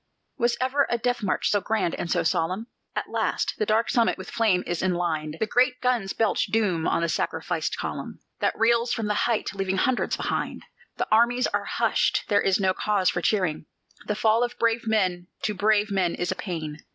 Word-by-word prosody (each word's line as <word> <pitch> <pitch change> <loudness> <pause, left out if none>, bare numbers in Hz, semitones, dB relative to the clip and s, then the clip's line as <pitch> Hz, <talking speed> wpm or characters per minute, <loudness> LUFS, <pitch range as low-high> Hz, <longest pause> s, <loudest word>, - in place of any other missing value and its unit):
Was 240 0 +2
ever 265 +2 +1
a 240 - +1
death 245 +1 -1
march 195 -3 0
so 205 - +2
grand 210 -4 0
and 170 - -4
so 175 -1 +1
solemn? 180 +6 0 0.3
At - - -3
last, - - 0
the 215 - 0
dark 220 +2 +2
summit 235 -2 +2
with - - -9
flame 210 -6 +2
is 175 -1 -2
enlined; 165 -4 -1
The - - +1
great 250 +3 +2
guns 240 -6 0
belch 225 -2 +1
doom 190 -8 +1
on 170 - +1
the - - +2
sacrificed - - -2
column, - - -5 0.2
That - - 0
reels 235 +1 +3
from 225 - -2
the 210 - 0
height, 215 -1 0
leaving 195 -1 -1
hundreds 255 +6 +1
behind. - - -3 0.3
The - - -1
armies 240 +3 +4
are - - 0
hushed - - +1
there 205 -1 +4
is 195 0 +2
no 190 -1 +2
cause 200 -1 +1
for 175 - -2
cheering: 180 -6 0 0.4
The 210 - 0
fall 220 +2 +3
of 245 0 -3
brave 230 0 +1
men 185 -5 +1 0.2
to 210 - 0
brave 210 +1 +2
men 185 -3 +1
is 175 - -2
a - - -2
pain. 160 -5 -5
210 Hz, 200 wpm, -25 LUFS, 180-230 Hz, 0.4 s, armies